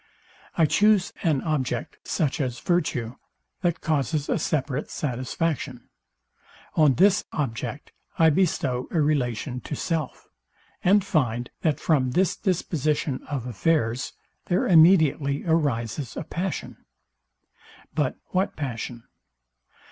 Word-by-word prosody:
I 165 - +5
choose 200 +5 +3
an 150 -6 +1
object, 130 -6 -2
such 150 -4 0
as 125 -3 -2
virtue, 130 -9 -1 0.4
that 175 -3 0
causes 145 -1 0
a - - +1
separate 140 -1 -1
satisfaction: 140 +3 -3 0.8
On 150 -5 +4
this 195 +2 +4
object 135 0 -4 0.3
I 160 -1 +6
bestow 145 -7 0
a 165 - 0
relation 130 -4 0
to 150 - -5
self; 165 -1 -3 0.6
and 200 +2 +4
find, 125 - 0
that 155 -3 +1
from 130 -6 +1
this 190 0 +3
disposition 155 - -1
of 135 -5 -3
affairs, 125 0 0 0.3
there 180 - +1
immediately 160 -5 +5
arises 140 -6 0
a - - -3
passion. 180 +4 -4 1.2
But 145 -4 0 0.2
what 190 +2 0
passion? 120 -4 -5
150 Hz, 110 wpm, -25 LUFS, 130-165 Hz, 1.2 s, I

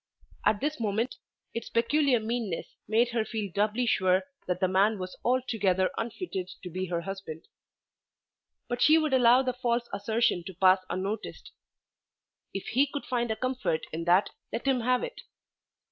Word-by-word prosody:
At 210 -1 +2
this 300 0 -1
moment 225 +3 -1 0.4
its 230 - -5
peculiar 250 +2 +3
meanness 220 -5 -3
made 230 +3 +3
her 235 -2 0
feel 215 -3 -4
doubly 215 +4 +1
sure 185 -4 +3 0.2
that 180 0 -1
the 185 - +3
man 200 +4 +3
was 185 -1 -6
altogether 210 -7 +1
unfitted 220 - -4
to 180 - -6
be 185 +2 -3
her 170 -1 -1
husband. 190 -4 -7 1.2
But 245 0 -3
she 310 +1 +7
would 310 -3 +1
allow 250 0 +6
the 255 -1 -1
false 240 -1 -1
assertion 210 -2 +1
to 190 -2 -8
pass 185 +1 +5
unnoticed. 195 +4 -4 1.0
If 195 - -5
he 270 +5 +3
could 285 - -4
find 240 -2 -1
a 220 - 0
comfort 255 -10 -1
in 165 +1 -3
that 180 +3 +4 0.2
let 230 - -4
him 265 -2 +3
have 250 +2 +1
it. - - -6
220 Hz, 160 wpm, -28 LUFS, 190-245 Hz, 1.2 s, she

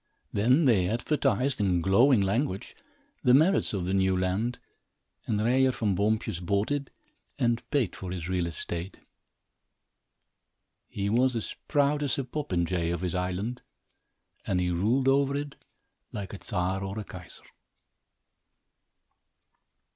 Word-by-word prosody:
Then 125 +10 +3
they 95 -8 +3
advertised, 130 +1 +1
in 90 -3 +2
glowing 110 +7 +4
language, 100 0 -1 0.5
the 125 - +6
merits 170 +8 +3
of 95 -4 -2
the 95 - -1
new 95 -1 +2
land 95 +7 -1 0.7
and 105 - 0
Ryer 130 +4 +3
Van 110 -5 0
Boompjes 110 0 0
bought 100 +7 0
it 145 -1 -2 0.5
and 120 -1 +1
paid 130 - 0
for 95 - -7
his 90 -2 -4
real 90 -2 0
estate. 85 +2 -5 1.9
He 100 0 -3
was 125 +4 +2
as 115 - -4
proud 145 0 +2
as 140 -3 0
a 135 - -1
popinjay 90 - -1
of 85 -1 -3
his 90 -1 -2
island 95 +7 -2 0.8
and 95 - 0
he 90 0 0
ruled 115 +10 +1
over 140 +1 +3
it 145 0 -4 0.6
like 100 -2 -6
a 100 - -9
Czar 95 +2 -1
or 95 +2 -5
a 110 - -3
Kaiser. - - -11
105 Hz, 135 wpm, -28 LUFS, 95-130 Hz, 1.9 s, the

